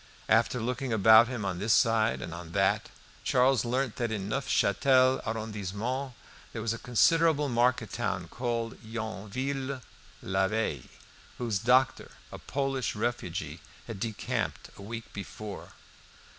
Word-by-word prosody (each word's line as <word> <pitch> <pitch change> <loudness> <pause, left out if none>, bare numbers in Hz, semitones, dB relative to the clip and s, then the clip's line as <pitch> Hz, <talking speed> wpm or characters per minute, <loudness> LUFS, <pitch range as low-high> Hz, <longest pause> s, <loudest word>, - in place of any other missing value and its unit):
After 115 +2 +3
looking 125 +2 -2
about 110 +2 +7
him 120 -5 -4
on 90 -2 -2
this 105 +3 +2
side 115 -1 +3
and 80 - -6
on 85 -1 -9
that, - - +1 0.3
Charles 130 -1 +3
learnt 125 0 -1
that 120 -2 -1
in 100 -2 -3
the 120 - 0
Neufchâtel 130 +1 +3
arrondissement 110 +4 -3 0.4
there 115 - -5
was 115 0 0
a 115 - -6
considerable 150 +5 +3
market 120 -3 +1
town 95 -7 -2
called 115 +1 -3
Yonville 120 +5 -4 0.4
l'Abbaye, 95 - -1 0.5
whose 115 -5 -1
doctor, 125 +4 +3 0.2
a - - -8
Polish 135 -3 -2
refugee, 95 -8 -3 0.3
had - - -7
decamped 110 0 -3
a - - -12
week 115 +3 -7
before. 105 0 -8
115 Hz, 130 wpm, -29 LUFS, 105-125 Hz, 0.5 s, about